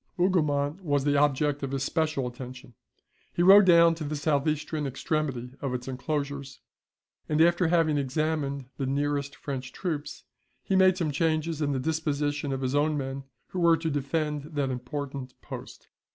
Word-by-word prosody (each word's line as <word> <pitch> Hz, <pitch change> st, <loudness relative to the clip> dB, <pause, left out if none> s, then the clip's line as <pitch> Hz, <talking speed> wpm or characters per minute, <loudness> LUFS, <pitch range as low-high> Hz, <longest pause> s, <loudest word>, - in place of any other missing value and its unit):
Hougoumont 155 Hz, -3 st, +1 dB
was 145 Hz, -4 st, +1 dB
the 145 Hz, 0 st, +2 dB
object 145 Hz, 0 st, +2 dB
of 135 Hz, -, -3 dB
his 135 Hz, 0 st, -2 dB
special 155 Hz, -3 st, 0 dB
attention. 125 Hz, 0 st, -8 dB, 0.6 s
He 175 Hz, -, 0 dB
rode 195 Hz, +2 st, +9 dB
down 170 Hz, -2 st, +6 dB
to 165 Hz, -1 st, -6 dB
the 150 Hz, +1 st, -3 dB
south 145 Hz, 0 st, 0 dB
eastern 150 Hz, -1 st, -1 dB
extremity 135 Hz, -2 st, -2 dB
of 135 Hz, -3 st, -2 dB
its 125 Hz, 0 st, -6 dB
enclosures, 140 Hz, +1 st, -4 dB, 0.7 s
and 155 Hz, 0 st, +1 dB
after 175 Hz, +1 st, +4 dB
having 160 Hz, -3 st, +2 dB
examined 140 Hz, 0 st, -1 dB
the 135 Hz, -, -2 dB
nearest 140 Hz, +1 st, -1 dB
French 130 Hz, -2 st, -5 dB
troops, 155 Hz, -6 st, -4 dB, 0.4 s
he 195 Hz, -, 0 dB
made 185 Hz, -1 st, +5 dB
some 165 Hz, -5 st, 0 dB
changes 160 Hz, +1 st, 0 dB
in 145 Hz, -1 st, +1 dB
the 135 Hz, -, -1 dB
disposition 145 Hz, -1 st, -1 dB
of 135 Hz, 0 st, -2 dB
his 130 Hz, 0 st, -1 dB
own 150 Hz, +1 st, +2 dB
men, 135 Hz, 0 st, -4 dB, 0.2 s
who 185 Hz, -, -4 dB
were 170 Hz, -1 st, +5 dB
to 160 Hz, 0 st, -2 dB
defend 150 Hz, +1 st, -2 dB
that 140 Hz, -2 st, 0 dB
important 130 Hz, +1 st, -5 dB
post. -, -, -9 dB
145 Hz, 165 wpm, -27 LUFS, 135-160 Hz, 0.7 s, rode